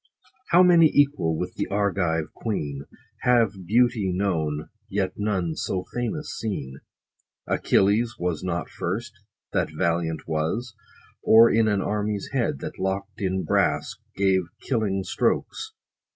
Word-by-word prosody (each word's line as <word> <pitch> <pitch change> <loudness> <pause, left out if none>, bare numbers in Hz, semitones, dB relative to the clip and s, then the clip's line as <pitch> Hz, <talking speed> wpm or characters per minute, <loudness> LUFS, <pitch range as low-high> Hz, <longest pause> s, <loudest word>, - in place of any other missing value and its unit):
How 175 +2 +6
many 170 -3 +7
equal 140 - +3
with - - -4
the - - -3
Argive 90 -6 0
queen, 70 -11 -4
40 - - -23 0.3
Have 100 -7 +2
beauty 110 -3 +2
known, 80 -6 -1 0.2
yet 100 -1 -1
none 95 -6 -1
so 95 -1 -2
famous 120 +6 -3
seen? 70 -12 -4 0.7
Achilles 110 +5 +2
was 85 -2 -2
not 85 -2 -2
first, 115 +6 -4 0.4
that - - +1
valiant 80 0 -1
was, 80 +10 -2 0.5
Or, 115 +1 +7
in 110 0 +3
an 105 -2 +1
army's 105 -1 -2
head, 135 +3 0
that 155 0 -6
lock'd 95 +2 -3
in 95 -1 0
brass - - +1 0.2
Gave 95 -1 +3 0.2
killing 105 -6 -1
strokes. 445 - -1
100 Hz, 130 wpm, -25 LUFS, 85-115 Hz, 0.7 s, many